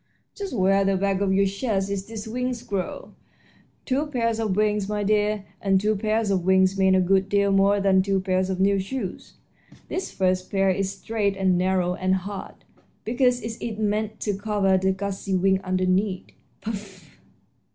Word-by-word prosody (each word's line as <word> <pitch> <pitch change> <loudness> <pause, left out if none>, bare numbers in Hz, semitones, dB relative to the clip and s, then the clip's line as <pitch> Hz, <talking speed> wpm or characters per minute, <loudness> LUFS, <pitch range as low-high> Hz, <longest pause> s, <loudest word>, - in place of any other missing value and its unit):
"Just 400 -3 -6
where 195 0 +3
the 195 0 +1
back 195 0 0
of 200 -1 +1
your 195 +1 +3
chest 195 0 -1
is 195 -1 -3
these 220 -1 -7
wings 250 +1 -3
grow 195 -4 -4 0.7
two 280 +4 0
pairs 230 -5 -1
of 215 -4 0
wings, 210 -1 +1
my 210 -1 -1
dear, 210 0 +1 0.2
and 195 -1 +3
two 215 +2 +1
pairs 215 +1 0
of 185 -3 +1
wings 190 +1 +3
mean 190 -1 +3
a - - +4
good 190 +1 +2
deal 200 0 +2
more 195 +1 +4
than 195 -1 +4
two 195 0 0
pairs 185 0 0
of 185 -1 -2
new 195 +1 +3
shoes. 195 0 -5 0.5
This 375 - -3
first 185 -1 0
pair 195 -1 +2
is 195 +1 -1
straight 205 -2 -2
and 190 -1 +2
narrow 180 0 +1
and 185 +1 0
hard, 195 +1 -7 0.4
because 250 +1 +2
it 225 0 -6
is 225 -3 -4
meant 215 0 -1
to 205 -2 -1
cover 200 -1 +1
the 190 0 +2
gauzy 195 0 -3
wings 190 +1 +2
underneath. 185 +1 0 0.4
Puff!" 200 -5 -7
195 Hz, 180 wpm, -24 LUFS, 190-215 Hz, 0.7 s, a